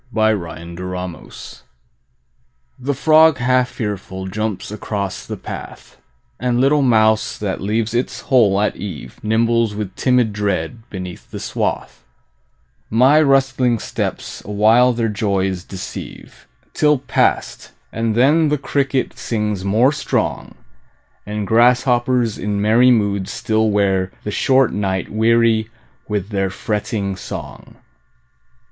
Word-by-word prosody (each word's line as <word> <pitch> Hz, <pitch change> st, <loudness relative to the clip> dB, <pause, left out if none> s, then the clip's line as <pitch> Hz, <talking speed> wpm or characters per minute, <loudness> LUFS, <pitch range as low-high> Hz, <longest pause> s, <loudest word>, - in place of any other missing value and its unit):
Summer 110 Hz, -6 st, +1 dB
Evening 90 Hz, +2 st, -7 dB, 1.5 s
The 135 Hz, +2 st, -2 dB
frog 155 Hz, +2 st, +5 dB
half 125 Hz, +1 st, +2 dB
fearful 95 Hz, -5 st, -5 dB
jumps 110 Hz, 0 st, -3 dB
across 100 Hz, -2 st, -4 dB
the -, -, -5 dB
path, -, -, -9 dB, 0.4 s
And 125 Hz, 0 st, 0 dB
little 140 Hz, +3 st, +3 dB
mouse 110 Hz, -4 st, +2 dB
that 100 Hz, -3 st, -3 dB
leaves 110 Hz, +3 st, -1 dB
its 120 Hz, +2 st, -2 dB
hole 105 Hz, -7 st, +3 dB
at 105 Hz, -, 0 dB
eve 90 Hz, -10 st, -8 dB
Nimbles 115 Hz, 0 st, +1 dB
with 105 Hz, -3 st, -5 dB
timid 125 Hz, -4 st, +2 dB
dread 105 Hz, +3 st, -3 dB
beneath 90 Hz, -3 st, -8 dB
the -, -, -7 dB
swath; -, -, -3 dB, 0.9 s
My 130 Hz, +7 st, +5 dB
rustling 135 Hz, -4 st, +2 dB
steps -, -, -5 dB
awhile 110 Hz, +5 st, +4 dB
their 115 Hz, -1 st, -1 dB
joys 95 Hz, -4 st, -1 dB
deceive, 95 Hz, -1 st, -9 dB, 0.3 s
Till 150 Hz, -1 st, +3 dB
past, 130 Hz, -, -1 dB, 0.2 s
and 115 Hz, -1 st, -1 dB
then 150 Hz, +6 st, +4 dB
the 150 Hz, -, +1 dB
cricket 140 Hz, -1 st, -1 dB
sings 105 Hz, -4 st, -2 dB
more 110 Hz, +7 st, +3 dB
strong, 150 Hz, -, -2 dB, 0.7 s
And 105 Hz, 0 st, -3 dB
grasshoppers 120 Hz, +1 st, +2 dB
in 105 Hz, 0 st, -2 dB
merry 115 Hz, +5 st, +4 dB
moods 100 Hz, -5 st, +1 dB
still 110 Hz, 0 st, 0 dB
wear 95 Hz, -2 st, +1 dB
The 105 Hz, -, -4 dB
short 130 Hz, +3 st, +2 dB
night 95 Hz, -3 st, -2 dB
weary 115 Hz, 0 st, +2 dB, 0.4 s
with 105 Hz, -2 st, -2 dB
their 95 Hz, -2 st, -1 dB
fretting 100 Hz, 0 st, -3 dB
song. -, -, -8 dB
110 Hz, 120 wpm, -19 LUFS, 100-125 Hz, 1.5 s, frog